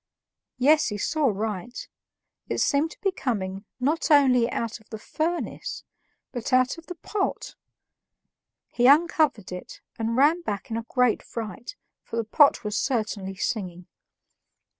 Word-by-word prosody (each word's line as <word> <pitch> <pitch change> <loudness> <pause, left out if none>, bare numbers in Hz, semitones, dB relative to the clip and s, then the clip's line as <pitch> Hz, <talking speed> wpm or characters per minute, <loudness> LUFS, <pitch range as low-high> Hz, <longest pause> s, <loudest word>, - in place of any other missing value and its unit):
Yes, 295 +5 +4
he 210 - -3
saw 300 +8 0
right; 220 +2 -3 0.6
it - - -1
seemed 290 +3 +2
to - - -14
be 390 - +1
coming 200 - -3
not 295 +7 0
only 255 -5 +5
out 230 0 -3
of 220 - -25
the 220 - -6
furnace 325 +10 -3 0.5
but 245 +1 -4
out 255 +5 +3
of 330 - -17
the 360 - -6
pot. 390 +4 -3 1.2
He 245 +1 +3
uncovered 300 - +3
it, 180 0 -8 0.2
and 230 +1 -1
ran 305 +6 +4
back 210 - -5
in 225 - -1
a 230 0 -6
great 250 -3 +2
fright, 225 - -7 0.3
for - - -8
the 230 - 0
pot 280 +5 +4
was 210 0 -3
certainly 215 -7 -1
singing! 185 -5 -3
245 Hz, 145 wpm, -25 LUFS, 215-295 Hz, 1.2 s, only